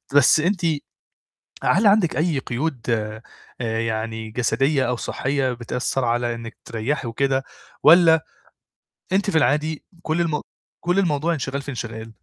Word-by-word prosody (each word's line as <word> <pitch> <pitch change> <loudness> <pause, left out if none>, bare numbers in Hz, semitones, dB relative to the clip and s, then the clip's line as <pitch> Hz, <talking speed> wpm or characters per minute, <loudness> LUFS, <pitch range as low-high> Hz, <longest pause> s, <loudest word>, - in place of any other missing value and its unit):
بس 145 +2 +6
أنتِ 180 +3 0 1.0
هل 205 +4 +4
عندِك 200 -9 +3
أي 155 -3 +1
قيود 130 +1 -3
آآ، 110 -1 -1 0.4
يعني 110 -1 -2
جسدية 135 +3 +1
أو 125 - +1
صحّية 130 +1 -1
بتأثّر 125 +2 -2
على 120 0 0
إنِّك 115 -1 -9
تريّحي 120 +3 -2
وكده 135 +3 0 0.4
والّا 160 0 +7 0.9
أنتِ 200 +1 +2
في 160 - +2
العادي 150 +3 +1 0.2
كل 160 +1 0
الم 160 -3 0 0.4
كل 175 +3 +1
الموضوع 165 -2 +1
انشغال 140 -1 -3
في 145 - -8
انشغال؟ 115 -2 -6
135 Hz, 135 wpm, -22 LUFS, 115-160 Hz, 1.0 s, والّا